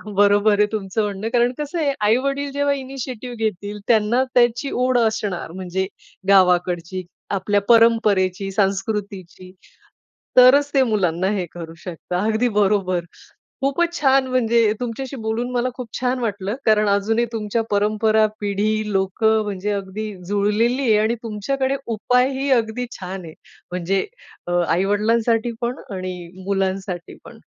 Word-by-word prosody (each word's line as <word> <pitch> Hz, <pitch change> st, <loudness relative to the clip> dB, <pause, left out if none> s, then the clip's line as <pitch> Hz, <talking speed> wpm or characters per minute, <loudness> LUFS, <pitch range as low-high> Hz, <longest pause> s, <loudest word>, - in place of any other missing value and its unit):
बरोबर 205 Hz, +1 st, +4 dB
आहे 210 Hz, -, +6 dB
तुमचं 215 Hz, 0 st, -2 dB
म्हणणं. 205 Hz, +1 st, -3 dB
कारण 240 Hz, 0 st, +3 dB
कसं 300 Hz, +3 st, -4 dB
आहे 285 Hz, -3 st, +1 dB
आई-वडील 275 Hz, +5 st, +1 dB
जेव्हा 285 Hz, 0 st, +1 dB
इनिशिएटिव्ह 260 Hz, -3 st, -6 dB
घेतील, 210 Hz, -2 st, -3 dB
त्यांना 230 Hz, +2 st, +3 dB
त्याची 245 Hz, +3 st, +2 dB
ओढ 255 Hz, 0 st, +1 dB
असणार 215 Hz, -7 st, -1 dB
म्हणजे 190 Hz, +1 st, -3 dB, 0.4 s
गावाकडची, 180 Hz, -1 st, +3 dB, 0.3 s
आपल्या 200 Hz, +1 st, +1 dB
परंपरेची, 205 Hz, -5 st, +3 dB
संस्कृतीची, 195 Hz, -2 st, -2 dB, 0.9 s
तरच 280 Hz, +3 st, +6 dB
ते 270 Hz, -, +5 dB
मुलांना 190 Hz, -6 st, +1 dB
हे 180 Hz, -3 st, -2 dB
करू 165 Hz, -1 st, -8 dB
शकतात. 180 Hz, 0 st, -4 dB
अगदी 220 Hz, +3 st, +1 dB
बरोबर. 190 Hz, -4 st, +1 dB, 0.6 s
खूपच 335 Hz, +6 st, +1 dB
छान 270 Hz, -2 st, +4 dB
म्हणजे 235 Hz, -3 st, +2 dB
तुमच्याशी 250 Hz, +3 st, -4 dB
बोलून 225 Hz, +3 st, -2 dB
मला 245 Hz, 0 st, 0 dB
खूप 250 Hz, -2 st, -7 dB
छान 255 Hz, 0 st, 0 dB
वाटलं, 205 Hz, -3 st, -2 dB
कारण 215 Hz, -1 st, +4 dB
अजूनही 210 Hz, +4 st, +2 dB
तुमच्या 225 Hz, 0 st, -1 dB
परंपरा, 215 Hz, +1 st, +2 dB
पिढी, 210 Hz, +1 st, -1 dB
लोकं 215 Hz, +3 st, +2 dB
म्हणजे 205 Hz, 0 st, -3 dB
अगदी 200 Hz, +2 st, -4 dB, 0.2 s
जुळलेली 210 Hz, +6 st, +1 dB
आहे 225 Hz, -5 st, +4 dB
आणि 220 Hz, +2 st, +1 dB
तुमच्याकडे 265 Hz, +5 st, -1 dB, 0.2 s
उपायही 260 Hz, +5 st, +1 dB
अगदी 230 Hz, +2 st, -3 dB
छान 185 Hz, -1 st, -6 dB
आहे. 160 Hz, -1 st, -10 dB, 0.4 s
म्हणजे 180 Hz, +2 st, 0 dB, 0.4 s
अ, 175 Hz, -, -3 dB, 0.2 s
आई-वडिलांसाठी 220 Hz, +5 st, +1 dB
पण 240 Hz, +2 st, -2 dB, 0.2 s
आणि 185 Hz, -1 st, -4 dB, 0.3 s
मुलांसाठी 190 Hz, -2 st, -2 dB
पण. -, -, -13 dB
215 Hz, 130 wpm, -21 LUFS, 195-245 Hz, 0.9 s, आहे